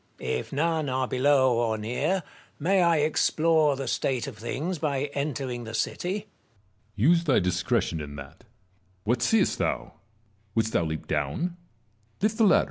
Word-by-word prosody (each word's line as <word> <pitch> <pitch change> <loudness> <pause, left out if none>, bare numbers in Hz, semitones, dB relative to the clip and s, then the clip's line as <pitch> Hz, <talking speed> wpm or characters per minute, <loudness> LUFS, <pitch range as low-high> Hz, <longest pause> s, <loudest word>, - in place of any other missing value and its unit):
If 65 - -3
none 160 0 0
are 130 0 0
below 130 -1 +3
or 115 -2 +1
near, 140 - -1 0.3
may 185 +5 +2
I 170 -2 +4
explore 155 0 +3
the 135 0 -5
state 130 -4 0
of - - -7
things 150 +10 -3
by 145 -1 -1
entering 135 -4 -3
the 110 0 -6
city? 175 +10 -1
Metellus. 210 +2 -4 0.8
Use 170 -1 +3
thy 135 -6 +4
discretion 90 -2 0
in 70 -1 -7
that. 70 +2 -11 0.6
What 120 +3 0
seest 210 - +2
thou? - - -1 0.6
Wouldst 110 -1 +1
thou 85 - +2
leap 80 0 -4
down? 75 - -1 0.6
Lift 215 +2 0
the 225 - +6
ladder. 190 - +6
135 Hz, 155 wpm, -27 LUFS, 110-165 Hz, 0.8 s, the